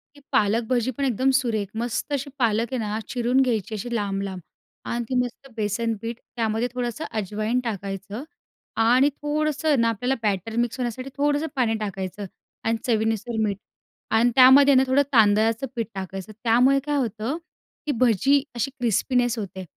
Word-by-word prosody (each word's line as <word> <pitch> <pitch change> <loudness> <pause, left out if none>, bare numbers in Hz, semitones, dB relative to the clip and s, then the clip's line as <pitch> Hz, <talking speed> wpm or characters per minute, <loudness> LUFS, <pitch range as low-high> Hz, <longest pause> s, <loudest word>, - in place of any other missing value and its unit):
ती - - -15
पालक 215 +3 +2
भजी 250 0 +1
पण 280 - 0
एकदम 260 +1 +2
सुरेख. 220 -6 -1
मस्त 240 +5 -2
अशी 280 0 -2
पालक 230 0 +1
आहे - - 0
ना? 210 +1 -2
चिरून 250 +1 +2
घ्यायची 225 -4 0
अशी 240 +4 -5
लांब-लांब 195 -3 -2 0.5
आणि 235 0 -1
ती 260 - -1
मस्त 245 +2 -8
बेसन 220 +2 -1
पीठ, 230 0 -4 0.2
त्यामध्ये 225 0 0
थोडंसं 250 +4 -3 0.2
अजवाईन 215 +5 -1
टाकायचं 200 0 -5 0.6
आणि 255 +5 +5
थोडंसं 295 0 0
ना 230 - +3
आपल्याला 245 +4 -1
बॅटर 210 +1 -1
मिक्स 240 +1 -4
होण्यासाठी 255 +2 -3
थोडंसं 290 +2 +1
पाणी 240 -4 +2
टाकायचं 195 -1 -4 0.4
आणि 225 0 +1
चवीनुसार 225 0 0
मीठ 205 -2 -1 0.6
आणि 230 +2 +4
त्यामध्ये 270 +2 +8
ना 260 - +6
थोडं 260 +2 +4
तांदळाचं 225 +2 +4
पीठ 230 -2 -2
टाकायचं. 190 +1 -6
त्यामुळे 250 +4 +4
काय 295 0 0
होतं 230 +2 -2 0.5
की 300 - 0
भजी 255 +5 +4
अशी 255 +3 -1
क्रिस्पीनेस 245 +1 +1
होते 190 -2 -6
235 Hz, 160 wpm, -24 LUFS, 215-260 Hz, 0.6 s, त्यामध्ये